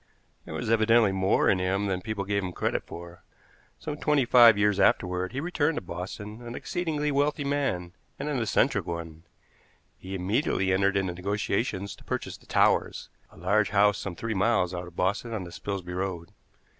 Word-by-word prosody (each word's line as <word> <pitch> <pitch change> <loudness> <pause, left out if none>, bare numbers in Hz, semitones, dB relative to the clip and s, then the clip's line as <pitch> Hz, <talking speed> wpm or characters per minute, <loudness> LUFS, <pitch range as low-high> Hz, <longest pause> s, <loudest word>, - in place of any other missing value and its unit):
There - - -7
was - - -4
evidently 115 -1 +4
more 95 0 +2
in 95 - +3
him 95 +2 0
than 95 -2 -1
people 110 -1 -3
gave 100 0 0
him 90 -1 -4
credit - - -1
for. 85 0 -10 0.5
Some 150 -1 -5
twenty 150 -3 +2
five 120 -3 +7
years 105 -1 +2
afterward 90 -1 +2
he 130 - -3
returned 160 -1 0
to - - -1
Boston 95 +5 -7
an 120 0 -7
exceedingly 155 -4 -2
wealthy 145 +1 +1
man, 135 -12 -1 0.2
and 140 - -4
an 145 -4 -1
eccentric 110 -4 +1
one. 85 -1 -6 0.7
He 95 +1 -6
immediately 95 0 0
entered 100 +1 +2
into 95 -2 -1
negotiations 100 +2 -2
to - - -17
purchase - - -4
the - - -19
Towers, - - +2 0.2
a - - -19
large 100 +5 +2
house 105 0 +3
some 95 -3 -5
three 115 +5 -3
miles 95 -2 +1
out 90 0 -5
of 85 - -14
Boston 100 +6 -1
on 100 - -3
the 85 - -9
Spilsby 95 -1 -5
Road. 90 -2 -4
100 Hz, 180 wpm, -27 LUFS, 90-120 Hz, 0.7 s, five